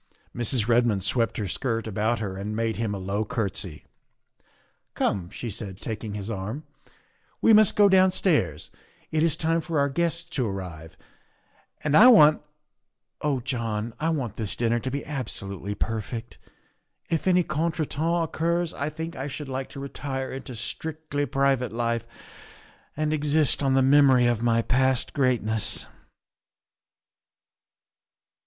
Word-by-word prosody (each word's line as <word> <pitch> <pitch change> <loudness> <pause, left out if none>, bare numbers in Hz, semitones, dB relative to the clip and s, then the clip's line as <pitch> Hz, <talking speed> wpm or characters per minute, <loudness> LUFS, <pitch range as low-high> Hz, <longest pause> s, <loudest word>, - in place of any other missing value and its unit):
Mrs. 120 -1 +1
Redmond 115 -5 +2
swept 115 +3 +1
her 105 - -2
skirt 115 +4 -2
about 110 +2 0
her 100 -3 -4
and 105 +2 -4
made 115 0 -1
him 110 -3 -2
a - - -4
low 100 +3 -2
courtesy. 100 -8 -3 0.5
" - - -39
Come," 90 -3 -1
she 115 +3 -6
said, 95 -2 -6
taking 110 -2 -5
his 100 -1 -5
arm, 110 +7 -4 0.4
" - - -39
we 225 - +7
must 215 -1 +6
go 205 -1 +6
downstairs, 185 - +2 0.4
it 155 - +1
is 160 -1 +2
time 165 +1 +1
for 165 0 -3
our 140 0 +2
guests 170 +3 -1
to 140 -8 -2
arrive, 90 -5 -7 0.9
and 150 -1 +1
I 220 +8 +9
want 155 -11 +7 0.8
oh 140 -4 0
John, 115 -3 -3
I 160 - 0
want 130 -10 -2
this 110 -3 -2
dinner 120 0 +1
to 130 - -4
be 140 +2 -4
absolutely 105 -8 -5
perfect. 115 +2 -4 0.7
If 165 +2 0
any 180 -1 +4
contretemps 160 +1 -1
occurs 170 +1 -1
I 140 +2 -3
think 160 +2 -6
I 135 +2 -4
should 145 0 -6
like 130 0 -4
to - - -9
retire 135 -1 -4
into 130 -1 -7
strictly 145 +4 -3
private 135 -3 +1
life 115 0 -1 0.9
and 155 0 0
exist 150 -1 +2
on 135 -2 +2
the 135 - +4
memory 135 -2 +5
of 120 -2 +1
my 115 -1 +2
past 130 0 +1
greatness. 115 -5 0
130 Hz, 150 wpm, -26 LUFS, 110-155 Hz, 0.9 s, I